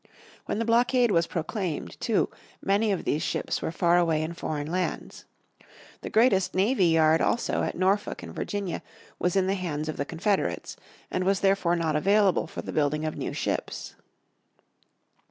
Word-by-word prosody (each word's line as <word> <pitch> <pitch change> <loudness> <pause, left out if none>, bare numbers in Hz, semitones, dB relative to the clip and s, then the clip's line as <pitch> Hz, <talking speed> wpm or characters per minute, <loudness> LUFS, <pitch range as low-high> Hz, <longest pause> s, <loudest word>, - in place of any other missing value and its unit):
When - - -1
the 230 - -1
blockade 240 +1 +3
was 170 -2 +2
proclaimed, 175 0 -4
too, 225 -4 +1 0.3
many 205 +2 +1
of 190 - -1
these 150 - 0
ships - - -2
were - - -2
far 170 +1 +3
away 160 -3 +2
in 160 +2 -4
foreign 150 -3 -3
lands. 180 +4 -3 0.8
The - - -5
greatest 215 -6 +3
navy 195 0 +3
yard, 160 -1 +4
also, 235 - +1
at - - -2
Norfolk 195 +3 0
in - - -8
Virginia, 200 -4 -3 0.4
was 180 +1 0
in 190 -1 +3
the 190 - +1
hands 160 -6 -3
of 155 - -4
the 145 - -1
Confederates, 190 +6 -1 0.4
and 185 - 0
was 195 +1 +1
therefore 195 -3 +2
not 165 -3 0
available 195 +4 +3
for - - -7
the - - -6
building 150 +1 +1
of 155 - -3
new - - -3
ships. - - -3
185 Hz, 170 wpm, -27 LUFS, 160-200 Hz, 0.8 s, yard